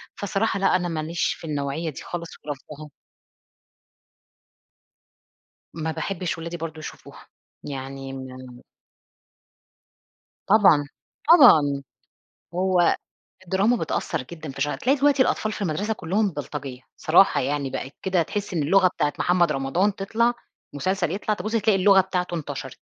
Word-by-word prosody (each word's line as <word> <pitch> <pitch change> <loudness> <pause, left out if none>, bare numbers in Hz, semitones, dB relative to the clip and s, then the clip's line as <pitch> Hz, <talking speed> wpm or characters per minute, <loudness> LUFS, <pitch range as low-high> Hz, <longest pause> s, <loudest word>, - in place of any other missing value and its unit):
فصراحة 205 +1 -1
لأ، 195 - +3
أنا 180 -1 0
ما 155 -2 -3
ليش 170 +2 -1
في 165 - -10
النوعية 145 +2 -2
دي 145 - -8
خالص 170 -1 -6 0.2
ورافضاها. 150 +1 -8 2.8
ما 160 0 -3
باحبش 180 0 -3
ولادي 170 +1 -5
برضه 160 -1 -6
يشوفوها. - - -11 0.4
يعني 135 -1 -6
م 130 -1 -9 1.9
طبعًا. 195 -8 +6 0.5
طبعًا. 150 - +7 0.7
هو 180 -1 +3 0.5
الدراما 195 +7 +2
بتأثّر 160 - -2
جدًا 155 +2 -9
في 135 - -9
شع 145 +1 0
تلاقي 270 +3 +1
دلوقتي 280 -1 +4
الأطفال 215 -3 0
في 210 - -5
المدرسة 195 +6 -1
كُلّهم 200 +3 0
بلطجية، 145 -4 -6 0.2
صراحة 175 +5 +4
يعني، 140 0 -1
بقت 135 - -5
كده 185 -2 +2
تحِس 205 +2 -4
إن 155 - +1
اللغة 185 +5 +4
بتاعة 150 -4 -1
محمد 175 -3 +3
رمضان 160 +9 0
تطلع 230 +5 +1 0.4
مسلسل 180 +2 -1
يطلع، 210 +2 -1
تبُص 215 +1 -5
تلاقي 220 -3 +3
اللغة 195 0 +6
بتاعته 180 -2 -2
انتشرت. 160 -4 -5
170 Hz, 130 wpm, -24 LUFS, 145-195 Hz, 2.8 s, طبعًا